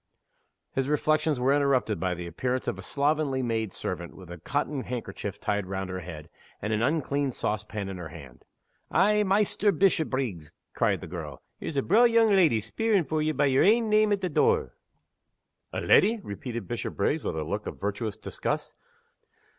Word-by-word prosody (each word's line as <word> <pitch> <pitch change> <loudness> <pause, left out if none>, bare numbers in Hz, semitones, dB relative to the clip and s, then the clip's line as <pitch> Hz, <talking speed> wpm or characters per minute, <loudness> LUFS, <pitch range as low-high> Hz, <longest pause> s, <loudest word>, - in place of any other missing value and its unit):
His 135 0 -1
reflections 155 -1 +1
were 130 +2 +3
interrupted 135 - +2
by 90 +1 -1
the 85 0 -6
appearance 125 +10 -2
of - - -2
a - - -6
slovenly 140 -2 0
maid 110 -4 -1
servant, 85 -2 -5
with 90 -2 -12
a 85 - -8
cotton 145 - -2
handkerchief 105 -5 -5
tied 105 -2 -1
round 95 -1 -4
her 95 - -3
head, 80 -3 -8 0.3
and 110 +2 -2
an 105 - 0
uncleaned 140 -1 0
sauce 110 0 -1
pan 105 -2 -5
in 95 -1 -5
her 90 - -6
hand. 70 -7 -12 0.5
"Eh, 210 +1 +4
Maister 205 +1 +2
Bishopriggs," 135 - 0 0.2
cried - - +1
the - - -6
girl, 80 -4 -7 0.2
"here's 145 - -5
a 135 - +2
braw 225 +7 +5
young 230 -1 +5
leddy 165 - +4
speerin' 200 - +1
for 155 +3 -1
ye 155 0 +1
by 145 -1 +1
yer 135 -1 +3
ain 225 +2 +4
name 215 0 +4
at 200 -1 +1
the 185 - -1
door." 455 - +2 1.0
"A - - -3
leddy?" 225 +1 +4
repeated 115 0 -6
Bishopriggs, - - -1
with - - -2
a 80 - -1
look 100 +7 -4
of - - -6
virtuous 105 +1 -3
disgust. 110 - -3
130 Hz, 180 wpm, -27 LUFS, 100-160 Hz, 1.0 s, braw